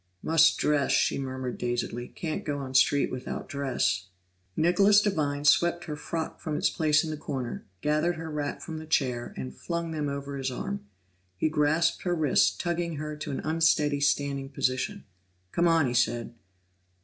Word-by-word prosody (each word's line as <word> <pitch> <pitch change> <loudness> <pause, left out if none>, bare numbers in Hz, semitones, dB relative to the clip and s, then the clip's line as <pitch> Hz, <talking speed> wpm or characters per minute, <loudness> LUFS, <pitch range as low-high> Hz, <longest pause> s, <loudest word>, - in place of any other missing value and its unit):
"Must 165 0 +5
dress!" 145 -2 +2
she - - +2
murmured 130 -2 -4
dazedly, 120 0 -2
"can't 160 -2 -4
go 145 -2 -2
on 135 -2 -6
street 135 +2 +4
without 130 0 -5
dress." 130 -9 -1 0.5
Nicholas 195 +5 +5
Devine 150 -8 -1
swept 175 +3 +4
her 155 -3 -5
frock 160 +2 -4
from 155 -3 -3
its - - +2
place 155 -2 +3
in 160 - -3
the 155 - -4
corner, 125 -6 -5
gathered 155 +4 +1
her 165 -1 -6
wrap 145 -1 -3
from 160 -1 -6
the 160 - -9
chair, 125 -6 0
and 65 -1 -5
flung 170 - -3
them 150 -2 -2
over 140 0 -5
his 135 -1 -2
arm. 200 - -5 0.5
He 155 - +1
grasped 155 +2 +2
her 175 -1 0
wrist, 155 -5 +3
tugging 170 -1 -1
her 150 +1 -4
to 150 - -6
an 135 - -3
unsteady 155 -2 +2
standing 140 -1 0
position. 130 -2 -1 0.5
"Come 170 0 +2
on," 165 -3 +4
he 120 - -1
said. 120 -1 +1
150 Hz, 175 wpm, -28 LUFS, 135-165 Hz, 0.5 s, Must